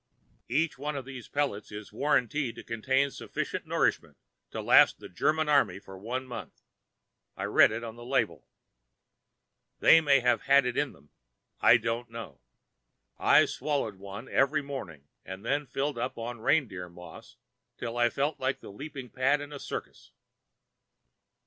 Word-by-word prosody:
Each 150 +2 0
one 145 +1 -3
of 135 -2 -5
these 130 -3 -9
pellets 140 -8 -2
is 105 0 -9
warranted 140 -2 +1
to - - -9
contain 130 +5 0
sufficient - - -4
nourishment - - 0 0.3
to - - -6
last - - +6
the - - -10
Germany 155 - +1
army 140 -8 +3
for 95 -1 -12
one 120 +7 -4
month. 125 -2 -9 0.7
I - - -4
read - - +6
it 115 +2 -4
on 115 0 -7
the 120 - -10
label. 130 +3 -1 1.3
They 165 - +7
may 140 -4 +4
have 125 0 +2
had 140 -1 +5
it 125 - -1
in 145 -2 0
them; 70 +1 -22 0.5
I 120 - +7
don't 115 +1 -3
know. 115 - -9 0.8
I - - +6
swallowed 140 -9 -2
one 100 +5 -8
every 145 +2 +2
morning 90 - -7 0.2
and 95 +3 -9
then 145 +3 0
filled 135 +1 -2
up 125 +2 -3
on 120 +1 -5
reindeer 105 - +1
moss 90 +1 -13 0.4
till 120 -1 -5
I 120 0 +3
felt 145 +5 -1
like 130 +1 -1
the - - -11
leaping 135 +2 -8
pad 135 +3 +2
in 145 0 -8
a 140 - -7
circus. - - -7
125 Hz, 160 wpm, -29 LUFS, 115-140 Hz, 1.3 s, They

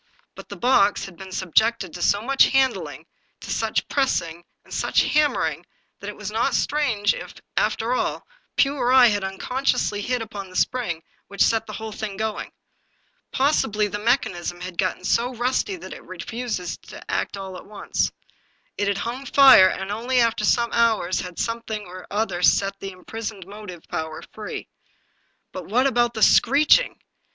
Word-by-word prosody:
But - - -12
the - - -6
box 220 -5 +3
had 195 - -11
been 190 +2 -10
sub 185 -3 -5
jected 220 -6 +2
to 175 - -7
so 205 +4 +2
much 270 +2 +5
handling, 265 -1 0 0.4
to - - -7
such - - -1
pressing 170 - -1 0.2
and - - -12
such - - +2
hammering, 300 -1 +1 0.4
that 200 - -6
it 210 - -7
was 210 -1 -5
not 230 +5 +1
strange 250 -9 +1
if, - - -8 0.2
after - - 0
all, - - -2 0.3
Pugh 280 +1 +3
or 250 -1 +1
I 260 -1 +8
had 205 -2 -1
unconsciously 205 +2 -1
hit 250 +4 -1
upon 205 -3 -8
the 185 - -14
spring 185 -11 -1 0.2
which 200 - +1
set 225 -1 +1
the - - -7
whole 220 0 -6
thing 210 -2 -5
going. 220 0 -3 0.8
Possibly 220 -7 +1
the 205 +1 -4
mechanism 185 -7 -1
had 180 -1 -7
got 185 -1 -1
so 245 +5 +1
rusty 255 - 0
that 350 - -9
it - - -8
had - - -17
refused 225 -7 -5
to - - -9
act - - -2
at 190 -1 -8
once. 210 -1 -2 0.7
It 205 - +1
had 200 -1 0
hung 245 +6 -4
fire, 260 -9 +8
and 190 +1 -4
only 245 +4 0
after 230 -2 +2
some 235 +2 +2
hours 225 -6 +2
had 180 -1 -8
something 230 -2 -3
or 185 +1 -10
other 200 -4 -1
set 195 +2 +3
the 195 - -5
imprisoned 205 +1 -7
motive 195 -3 -10
power 160 -2 -5
free. 215 -1 -7 0.8
But - - -7
what 250 +5 +2
about 240 -3 +2
the 220 - +1
screeching? 305 - +5
215 Hz, 175 wpm, -23 LUFS, 190-245 Hz, 0.8 s, I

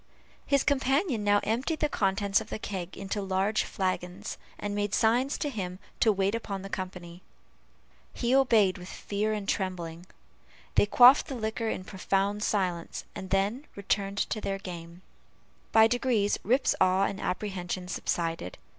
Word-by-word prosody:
His 280 -2 +3
companion 270 - +1
now 205 0 +4
emptied 255 +9 -1
the 300 - +2
contents 200 -4 +1
of - - -10
the - - -3
keg 190 -4 -5
into 195 +1 -3
large 195 +2 +1
flagons, 185 +1 -3 0.2
and 205 0 -4
made 205 -1 0
signs 245 +5 +2
to 295 - -2
him 185 -9 -4 0.2
to 220 - +5
wait 195 0 +1
upon 200 -4 -4
the 195 - -8
company. 180 -2 -6 0.9
He 240 +1 -1
obeyed 220 -8 +4
with 180 +1 -9
fear 210 +1 -2
and 210 -2 -3
trembling; 175 -3 -3 0.7
they - - +4
quaffed 250 +6 +7
the 270 - -5
liquor 220 0 -2
in 185 - -3
profound 195 +2 -1
silence, 180 -6 -1
and 190 - -7
then 205 +9 0
returned 200 0 -1
to 215 - -2
their 195 -1 -2
game. 175 -1 -9 0.7
By 220 0 +7
degrees, 235 -3 +1
Rip's 255 +7 +2
awe 185 +1 +4
and 200 0 -2
apprehension 185 -2 -3
subsided. 165 - -2
200 Hz, 155 wpm, -28 LUFS, 185-220 Hz, 0.9 s, quaffed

